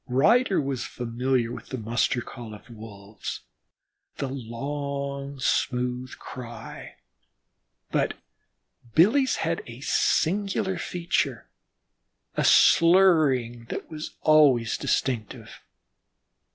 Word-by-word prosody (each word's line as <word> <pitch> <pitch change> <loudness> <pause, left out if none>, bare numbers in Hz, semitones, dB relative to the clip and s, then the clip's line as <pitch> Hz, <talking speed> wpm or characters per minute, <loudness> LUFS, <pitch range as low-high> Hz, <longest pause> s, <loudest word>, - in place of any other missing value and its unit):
Ryder 195 - +3
was 135 -3 -2
familiar 125 0 -1
with - - -8
the 130 - -5
muster 120 +2 0
call 120 -3 -9
of 105 - -15
the 120 - -13
Wolves, 105 -2 -8 0.8
the 140 - -3
long, 140 +2 -5
smooth 125 0 -1
cry, 120 -2 -9 1.0
but - - 0 0.8
Billy's 245 - +4
had 165 +1 -1
a 120 +1 -10
singular 190 +5 +1
feature, 175 -1 -2 0.8
a - - 0
slurring 155 -10 +4
that 115 - -6
was 155 0 -7
always 140 -7 +4
distinctive. 120 -5 -3
135 Hz, 95 wpm, -26 LUFS, 120-160 Hz, 1.0 s, Billy's